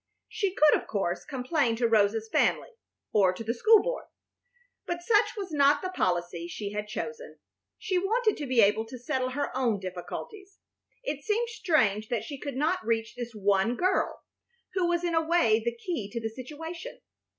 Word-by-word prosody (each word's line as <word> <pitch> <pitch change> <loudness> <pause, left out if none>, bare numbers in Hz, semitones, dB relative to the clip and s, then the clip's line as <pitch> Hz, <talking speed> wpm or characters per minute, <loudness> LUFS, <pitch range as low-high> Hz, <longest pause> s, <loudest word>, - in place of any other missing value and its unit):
She 395 -3 -1
could, 305 0 +6
of - - -15
course, 195 -4 -2
complain 265 -2 0
to 235 +1 +1
Rosa's 220 0 +2
family, - - +1 0.4
or 195 -4 +5
to 205 - -7
the 225 +1 -1
school 430 - +5
board, - - -3 0.8
but 345 0 -3
such 435 +2 +3
was 390 -4 -5
not 285 -1 +4
the 370 - -2
policy 175 - -1
she 200 +3 -5
had 210 0 -4
chosen. 470 - -6 0.4
She 370 -2 0
wanted 435 +3 +1
to 290 - -4
be 250 -2 +4
able 210 +2 +4
to 255 - -8
settle 255 +1 -1
her 280 0 -3
own 240 -6 +1
difficulties. 285 - -7 0.5
It 295 - -4
seemed 455 +6 0
strange 220 - +1
that 240 - -1
she 280 -3 -7
could 280 -2 -5
not 305 +4 0
reach 225 0 -1
this 240 -1 -6
one 200 +3 +2
girl 370 +6 0 0.5
who 370 -2 +1
was 345 0 0
in 345 -1 0
a 325 - +3
way 315 -10 +3
the 235 0 -2
key 240 - -4
to 235 - -2
the 225 -1 -3
situation. 320 - -8
260 Hz, 185 wpm, -28 LUFS, 220-350 Hz, 0.8 s, could